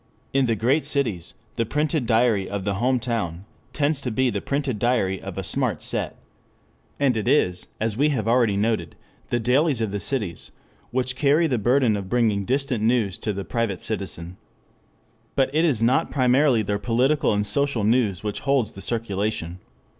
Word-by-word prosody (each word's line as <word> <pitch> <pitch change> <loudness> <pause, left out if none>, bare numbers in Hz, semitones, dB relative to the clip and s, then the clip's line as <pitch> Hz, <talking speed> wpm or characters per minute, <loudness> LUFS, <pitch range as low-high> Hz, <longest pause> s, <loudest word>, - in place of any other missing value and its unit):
In 135 -1 +3
the 115 - +1
great 125 +9 +2
cities 110 - -2 0.2
"the 115 - +2
printed 150 -1 0
diary 115 -4 +2
of 100 -1 -3
the 100 +1 -1
home 130 +1 +2
town" 105 -7 -3 0.3
tends 145 -1 0
to 130 - -3
be 125 +2 +1
the - - -3
printed 140 -5 -2
diary 100 -6 +1
of - - -7
a - - -2
smart - - 0
set. - - -1 0.8
And 135 -4 +2
it 110 0 -2
is, 90 -10 +2
as 110 -1 -1
we 145 +6 +2
have 115 -7 -1
already 115 -4 +3
noted, 105 -6 -1 0.3
the 120 - 0
dailies 130 +3 +2
of 110 -3 -1
the 100 - -2
cities 105 -8 -3 0.4
which 125 0 -1
carry 150 +4 +3
the 130 -7 0
burden 120 0 +3
of 100 -2 -5
bringing 110 -5 +1
distant 130 -3 -1
news 110 -4 +1
to 110 - -2
the 100 -1 -5
private 115 -6 -2
citizen. 95 -4 -5 1.0
But 135 0 +1
it 160 +3 +3
is 125 -9 +1
not 130 +8 +2
primarily 130 -2 +3
their 100 0 -1
political 125 +8 +2
and 105 0 0
social 130 +1 0
news 110 -4 +1
which 105 -1 -3
holds 135 -6 +1
the 95 - -11
circulation. 100 -6 -2
115 Hz, 180 wpm, -23 LUFS, 105-135 Hz, 1.0 s, In